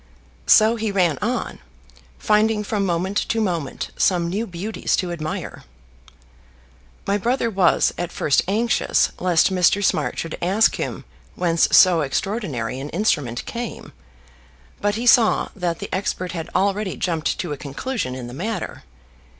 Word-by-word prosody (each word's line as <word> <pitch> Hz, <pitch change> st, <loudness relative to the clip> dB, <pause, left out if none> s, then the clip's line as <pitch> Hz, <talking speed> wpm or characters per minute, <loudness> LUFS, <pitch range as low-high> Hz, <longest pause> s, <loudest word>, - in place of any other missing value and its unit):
So 220 Hz, +2 st, +6 dB
he 220 Hz, -1 st, -2 dB
ran 175 Hz, -7 st, +1 dB
on, -, -, -2 dB, 0.6 s
finding 215 Hz, 0 st, +2 dB
from 205 Hz, -1 st, -1 dB
moment 185 Hz, +3 st, -1 dB
to 230 Hz, -, 0 dB
moment 175 Hz, -9 st, -2 dB
some 175 Hz, -2 st, +2 dB
new 210 Hz, +6 st, -2 dB
beauties 190 Hz, +5 st, -2 dB
to 180 Hz, -2 st, -2 dB
admire. 155 Hz, -2 st, -5 dB, 1.4 s
My 200 Hz, +1 st, 0 dB
brother 235 Hz, +2 st, 0 dB
was 190 Hz, -4 st, +3 dB
at 175 Hz, -1 st, -3 dB
first 140 Hz, -, +2 dB
anxious 220 Hz, +4 st, +1 dB
lest 180 Hz, +1 st, +3 dB
Mr. 185 Hz, +2 st, +3 dB
Smart 160 Hz, -6 st, 0 dB
should 165 Hz, -, -5 dB
ask 195 Hz, +6 st, +3 dB
him -, -, -4 dB, 0.3 s
whence 170 Hz, -2 st, +2 dB
so 175 Hz, -3 st, +6 dB
extraordinary 140 Hz, -, -2 dB
an 140 Hz, +2 st, -6 dB
instrument 145 Hz, -, -1 dB
came, 235 Hz, -1 st, -6 dB, 0.9 s
but 205 Hz, 0 st, +1 dB
he 235 Hz, +2 st, -3 dB
saw 235 Hz, -2 st, +4 dB
that 175 Hz, -4 st, -2 dB
the -, -, -7 dB
expert 185 Hz, -1 st, -2 dB
had 165 Hz, -2 st, -5 dB
already 200 Hz, 0 st, 0 dB
jumped 165 Hz, -3 st, -1 dB
to 175 Hz, -, -4 dB
a -, -, -3 dB
conclusion 145 Hz, -, -4 dB
in 130 Hz, -2 st, -6 dB
the 120 Hz, -, -9 dB
matter. 215 Hz, -, -4 dB
185 Hz, 145 wpm, -22 LUFS, 165-215 Hz, 1.4 s, So